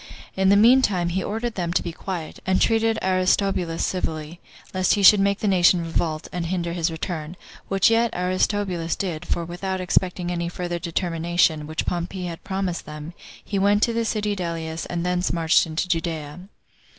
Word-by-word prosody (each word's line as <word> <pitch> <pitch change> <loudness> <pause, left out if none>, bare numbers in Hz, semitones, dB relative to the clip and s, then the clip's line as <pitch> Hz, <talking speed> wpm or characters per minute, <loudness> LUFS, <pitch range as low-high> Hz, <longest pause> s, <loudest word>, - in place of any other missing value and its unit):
In 190 0 +3
the 200 - +6
mean 240 +6 +6
time, 180 -7 +1
he 185 +2 -1
ordered 225 +3 -3
them 175 -4 -2
to - - +1
be 170 - -4
quiet; 170 -1 -6
and 190 0 +1
treated 225 0 +2
Aristobulus 185 -2 +1
civilly, 160 -2 -3 0.3
lest 185 +1 +2
he 205 - -1
should 205 +2 +9
make 200 0 +1
the 215 - 0
nation 180 -2 +4
revolt, 160 -1 -2
and 175 -2 -3
hinder 170 -1 -2
his 170 -1 0
return; 160 0 -5 0.3
which 195 +2 +3
yet 230 +1 +3
Aristobulus 180 -1 0
did; 175 -5 -4
for 170 - -1
without 185 +2 -4
expecting 180 -1 0
any 170 -1 -2
further 175 0 -4
determination, 170 -2 0
which 155 0 -3
Pompey 180 +1 -3
had 170 -2 -6
promised 190 -2 -3
them, 150 +2 -8 0.3
he 200 - -2
went 205 +2 +3
to 235 - +2
the 230 0 0
city 210 -2 -1
Delius, 165 -3 -4
and 175 0 -3
thence 180 0 0
marched 165 0 +3
into 160 +3 -2
Judea. 165 -3 -3
180 Hz, 180 wpm, -23 LUFS, 170-195 Hz, 0.3 s, should